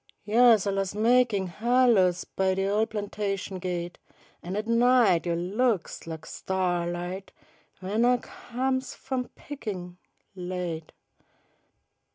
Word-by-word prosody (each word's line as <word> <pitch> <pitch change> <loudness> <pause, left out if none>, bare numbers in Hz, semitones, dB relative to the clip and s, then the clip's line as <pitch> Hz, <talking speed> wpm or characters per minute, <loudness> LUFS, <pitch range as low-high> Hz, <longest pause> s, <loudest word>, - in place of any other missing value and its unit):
Yo's 225 0 +5
alius 195 -1 -1
makin' 230 -2 +3
halos 210 -2 +3
By 190 -1 0
de 195 0 0
ol* 210 +2 +2
plantation 200 -2 -3
gate, 175 -1 -4 0.4
An' 180 +3 -5
at 210 +1 -2
night 230 -7 +4
yo' 170 - +1
Looks 195 +2 -1
lak 160 -1 -7
sta'light 180 0 -2 0.5
W'en 210 +5 0
ah 250 +1 +5
comes 260 +2 -3
f'um 255 -2 -4
pickin', 190 -11 -7 0.4
late. 180 -3 -4
195 Hz, 110 wpm, -27 LUFS, 180-235 Hz, 0.5 s, Yo's